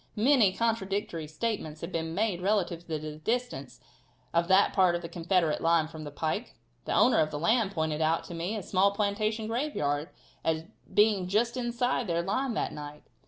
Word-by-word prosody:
Many 230 -3 +4
contradictory 200 -6 -1
statements 155 -2 -3
have 170 - -5
been 165 -1 -3
made 200 -3 0
relative 180 -4 0
to 160 -2 -2
the 155 0 -7
distance 225 - -3 0.5
of 170 0 +2
that 190 +2 +4
part 185 -3 +4
of 175 - -4
the - - -4
Confederate 170 -1 0
line 165 -1 +3
from 155 -1 -9
the - - -5
pike. 155 +2 -3 0.3
The - - -2
owner - - +5
of 155 - +2
the 150 - -4
land 215 +5 +2
pointed 160 -2 -1
out 160 +1 +2
to - - -9
me 170 +6 -3
a 210 - -4
small 195 +2 +2
plantation 215 +1 0
graveyard 215 - -1 0.3
as 160 0 0 0.3
being 205 -3 +3
just 225 +6 +1
inside 245 -1 -1
their 170 -1 0
line 245 +6 -1
that - - -1
night. 150 0 -8
185 Hz, 185 wpm, -29 LUFS, 160-215 Hz, 0.5 s, owner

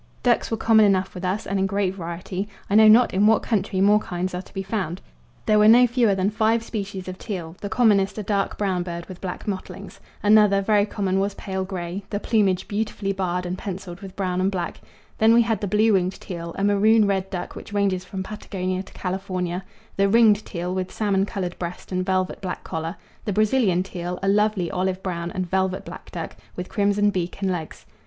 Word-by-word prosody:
Ducks 245 -2 +2
were 225 - -1
common 220 -1 +5
enough 195 -1 +2
with 180 - -8
us 185 +4 -1
and 195 0 -1
in 190 - +2
great 195 -1 0
variety; 180 +2 -5 0.2
I - - +1
know 220 +1 +8
not 230 +3 +6
in 200 +3 +4
what 220 -1 +4
country 200 -3 0
more 205 +2 +5
kinds 180 -2 -4
are 180 - -3
to - - -18
be 195 -1 -4
found. 190 -3 -3 0.5
There 215 -1 +4
were 210 - +6
no 240 +3 +8
fewer 235 -4 +2
than 190 +2 +1
five 220 +1 +2
species 200 -4 -5
of 185 0 -6
teal, 175 -6 -5
the 205 - -4
commonest 205 -3 +3
a 215 - -3
dark 200 0 -1
brown 190 -3 0
bird 170 -1 -5
with 185 -2 -11
black 180 -2 -5
mottlings; 195 -2 -6 0.2
another, 210 -1 +5
very 205 +1 +2
common, 195 -2 -1
was 200 0 -1
pale 190 -1 -3
grey, 185 0 -5
the 205 - -2
plumage 200 -5 +1
beautifully 205 -1 -2
barred 180 -1 -2
and 180 +1 -4
pencilled 185 -2 -6
with 195 -1 -9
brown 185 -2 -1
and 190 - +2
black; 180 -3 -4 0.4
then 225 +1 +6
we 235 - +6
had 225 -3 -1
the 205 - -1
blue 215 +3 +3
winged 185 -1 +1
teal, 170 -2 -7
a 195 - -1
maroon 210 +2 +4
red 195 -1 0
duck 180 -2 -5
which - - -9
ranges 200 -3 0
from 190 0 -5
Patagonia 185 -2 -4
to 195 - -14
California; 185 -1 -3 0.3
the 195 0 +3
ringed 215 -1 +5
teal, 180 -1 -3
with 185 0 -3
salmon 200 -2 0
coloured 180 -3 -4
breast 175 +2 -6
and 185 0 0
velvet 185 -1 -1
black 185 -2 -4
collar; 160 +2 -4 0.3
the 205 - -1
Brazilian 210 -3 +2
teal, 180 -1 -5
a - - 0
lovely 205 -3 +2
olive 185 0 -1
brown 170 -2 -3
and 185 0 -3
velvet 190 +1 -1
black - - -10
duck, - - -6 0.2
with 180 0 -5
crimson 205 0 +2
beak 180 -1 -3
and 190 - +1
legs. 165 -4 -6
195 Hz, 215 wpm, -23 LUFS, 185-210 Hz, 0.5 s, know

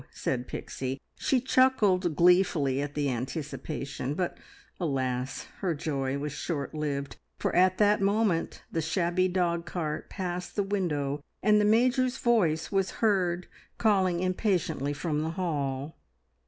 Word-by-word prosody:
said 125 -1 -3
Pixie. 130 +1 -4 0.2
She 265 - +2
chuckled 210 - +3
gleefully 170 -6 +4
at 145 0 -4
the 145 -1 0
anticipation; 140 +1 -4
but, 180 0 -1 0.4
alas! 130 -5 -2
her 180 -5 0
joy 140 -2 -2
was 145 +1 -3
short 145 0 -3
lived, 145 -2 -3 0.2
for - - -1
at 185 +1 +4
that 210 0 +4
moment 200 -3 +1
the 165 - 0
shabby 175 +2 +1
dogcart 170 -3 -2
passed 180 -2 -4
the 205 - +1
window, 150 -8 -1 0.2
and 210 +1 +5
the - - +3
Major's 250 +4 +3
voice 175 -10 +2
was 195 -1 +1 0.2
heard 180 -4 +2 0.3
calling 190 -5 +2
impatiently 185 - 0
from 150 +1 -1
the 160 - -1
hall. 145 -4 -2
170 Hz, 130 wpm, -28 LUFS, 145-195 Hz, 0.4 s, and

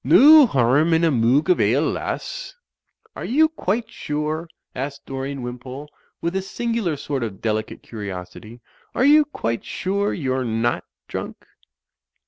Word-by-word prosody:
No 300 0 +8
harm 140 - +3
in 165 - +2
a 165 - +4
moog 130 +5 +3
of 180 -2 +3
ale, 120 +9 +3
lass/' - - -4 0.6
"Are - - -6
you 310 +6 +4
quite 225 - -2
sure," 155 +3 -3 0.3
asked 140 +2 -5
Dorian 135 0 -5
Wimpole, 125 +4 -7 0.3
with 170 +2 -2
a 190 - +1
singular 225 -4 -2
sort 140 -1 -3
of 105 -5 -4
delicate 110 -1 -3
curiosity, 105 +2 -8 0.3
"are 255 - +3
you 300 +1 +6
quite 115 - -3
sure 200 +2 -1
you're 130 -4 -1
not 115 0 -1 0.2
drunk." - - -6
145 Hz, 140 wpm, -22 LUFS, 120-190 Hz, 0.6 s, No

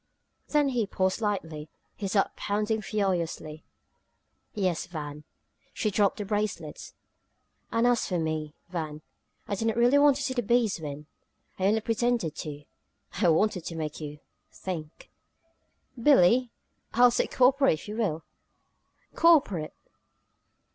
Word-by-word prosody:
Then 295 -2 +2
he 240 -5 0
paused 190 0 0
slightly, 165 -8 -3 0.3
his 195 -2 -4
heart 195 -2 +2
pounding 210 +2 -1
furiously. 175 -7 -2 0.9
"Yes 185 -5 -1
Van." 150 -3 -7 0.5
She 215 - 0
dropped 200 0 +2
the 205 - -4
bracelets. 205 -7 -3 0.8
"And 230 +1 +2
as 245 -1 +2
for 180 - -1
me 155 -2 -3
Van, 155 -3 -5 0.4
I - - -3
didn't 225 +3 -1
really 245 +4 +5
want 285 -1 +6
to 280 - -3
see 260 - -1
the 245 - 0
bees 230 -4 +1
win! 150 0 -6 0.5
I 190 - +2
only 220 +2 +2
pretended 230 -7 0
to 145 -2 -6 0.6
I 180 - +5
wanted 180 +2 +2
to 165 - -5
make 155 -1 -4
you 150 -1 -6 0.3
think!" 165 -4 -7 0.9
"Billie! 245 -1 +5 0.5
I'll 245 +1 +7
say - - +1
'cooperate' 270 - +4
if 155 - -12
you 210 +1 -5
will!" 165 -9 -1 0.9
"Cooperate!" 265 - +4
200 Hz, 135 wpm, -28 LUFS, 160-235 Hz, 0.9 s, I'll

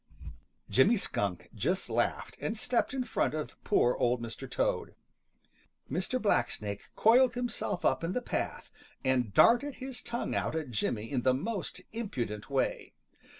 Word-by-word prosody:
Jimmy 205 - +5
Skunk 100 - -2
just - - -1
laughed - - -1
and 220 - -2
stepped 245 +2 +1
in 265 -1 -1
front 200 - 0
of 155 - -4
poor 125 - +3
Old 125 0 +2
Mr. 115 -2 -7
Toad. - - -1 1.0
Mr. 185 - -1
Blacksnake 105 - 0
coiled 245 +2 +5
himself 235 -6 -2
up 130 +2 +2
in 170 +2 -1
the - - +1
path - - -3 0.3
and 130 -5 +1
darted 245 - +5
his 260 -1 -6
tongue 235 0 -3
out - - -1
at 155 -5 -3
Jimmy 110 +1 -2
in 130 -3 +1
the 130 +1 +3
most 195 - -3
impudent 120 - -4
way. 135 -1 -1
160 Hz, 150 wpm, -31 LUFS, -, 1.0 s, Jimmy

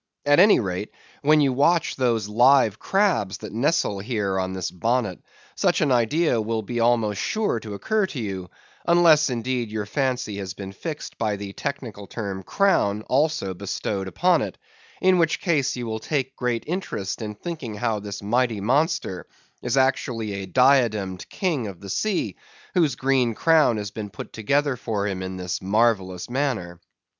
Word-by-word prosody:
At 145 +1 +5
any 205 +3 +7
rate, 95 -1 -3 0.3
when 150 +1 +5
you 135 -2 +3
watch 165 +6 +2
those 115 -5 +1
live 120 0 +4
crabs 190 - +1
that - - -9
nestle 130 -4 +1
here 100 -3 -1
on 95 0 -2
this 95 -2 -3
bonnet, 110 +1 -1 0.3
such - - +1
an 145 - +2
idea 125 +2 +2
will 110 0 -2
be 120 +3 -3
almost 115 -4 +2
sure 215 - 0
to 105 -2 -7
occur 215 - 0
to 145 - -6
you; 95 -5 -4 0.4
unless, 165 -3 +5
indeed, 120 -1 -2
your 105 -1 -3
fancy 125 -3 -1
has 95 -1 -5
been 95 -1 -7
fixed 150 - -7
by 110 -2 0
the 100 -1 -7
technical 120 -8 -5
term 100 -4 -5
"crown" 105 - +1
also 145 -8 0
bestowed 100 +1 -3
upon 175 - +2
it; - - -4 0.4
in 185 -1 +4
which 165 -2 +2
case 155 -8 +1
you 125 -1 -4
will 110 -1 -3
take 135 +1 -2
great 120 -2 -1
interest 135 - -3
in 105 -1 -5
thinking 130 -4 -6
how 110 0 -1
this 100 0 -7
mighty 120 +1 +1
monster 125 - 0 0.3
is 125 +2 -1
actually 125 -5 +1
a 100 -1 -5
diademed 110 -7 +2
king 155 - -1
of 95 -4 -8
the 100 - -9
sea, 215 - -1 0.4
whose 160 -9 +2
green 130 -4 +1
crown 160 -7 +4
has 105 -1 -4
been 105 -1 -6
put - - -9
together 140 +5 +1
for 110 -4 -2
him 95 -2 -3
in 95 0 -5
this 90 -1 -3
marvellous 95 -3 +1
manner. 120 -10 -2
115 Hz, 170 wpm, -24 LUFS, 100-140 Hz, 0.4 s, any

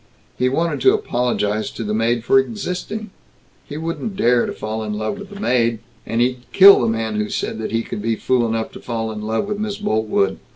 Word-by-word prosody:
He 125 0 +1
wanted 165 +5 -1
to 395 +2 +5
apologize 120 - -1
to 115 - -6
the 105 0 -2
maid 115 +1 +1
for 135 +3 +5
existing.... 205 +5 -4 0.6
He 145 - -6
wouldn't 165 +6 -4
dare 120 -7 +3
to - - -3
fall 110 +1 -4
in 105 -1 -3
love 110 - -3
with 205 -1 -9
the 200 -1 -10
maid.... 120 - +1 0.3
And 115 +1 0
he'd 125 +1 +1
kill 195 -3 +8
the 120 - +1
man 110 -1 -1
who 105 0 -1
said 110 - -3
he 115 +1 -1
could 105 - -6
be 115 +1 0
fool 120 0 +1
enough 110 0 -2
to - - -10
fall 115 -2 -3
in 105 -1 -6
love 110 - -1
with 210 0 -3
Miss 210 -1 -3
Boltwood. 110 - 0
120 Hz, 215 wpm, -20 LUFS, 110-180 Hz, 0.6 s, kill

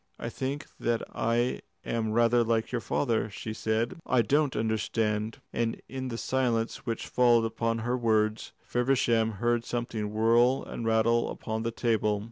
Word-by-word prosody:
"I - - -4
think 140 +3 -4
that 115 0 0
I 120 +2 0 0.2
am 115 -2 -1
rather 120 +1 +4
like 115 -1 0
your 120 -2 -1
father," 115 -4 0
she 110 +2 -6
said. 115 +10 -1
"I 125 -2 +2
don't 145 +4 +2
understand;" 110 0 -1
and 115 -1 -1
in 130 0 -5
the 115 -2 -4
silence 120 -1 -1
which 115 -1 -2
followed 120 -2 +4
upon 115 0 -1
her 120 +1 +1
words 110 -2 +1
Feversham 120 -3 +1
heard 120 +3 0
something 115 -3 -3
whirr 115 +4 +3
and 115 - -5
rattle 115 +1 +3
upon 110 0 -4
the 115 - -1
table. 110 -3 +1
115 Hz, 155 wpm, -28 LUFS, 110-120 Hz, 0.2 s, rather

